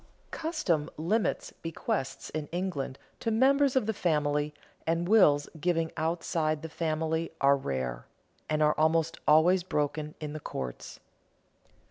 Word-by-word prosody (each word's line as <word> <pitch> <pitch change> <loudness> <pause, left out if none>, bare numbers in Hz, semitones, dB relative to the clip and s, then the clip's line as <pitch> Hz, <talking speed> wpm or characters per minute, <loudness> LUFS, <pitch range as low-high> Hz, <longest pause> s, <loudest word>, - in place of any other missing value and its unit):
Custom 250 - -1
limits 200 +8 0
bequests 135 -4 -3
in 155 -1 -3
England 170 -7 -3 0.2
to 230 - -1
members 270 +4 +4
of 260 - +3
the 220 - 0
family, 150 -5 +1 0.4
and 165 +1 +1
wills 150 -9 +5
giving 165 0 0
outside 160 -1 -1
the 160 - -5
family 160 0 -1
are 140 0 +5
rare, 65 - -3 0.4
and 155 0 +2
are 150 0 +4
almost 160 +1 +2
always 165 +5 +6
broken 150 -2 -2
in 150 -2 -5
the 155 - -5
courts. 65 - -6
160 Hz, 130 wpm, -29 LUFS, 150-175 Hz, 0.4 s, always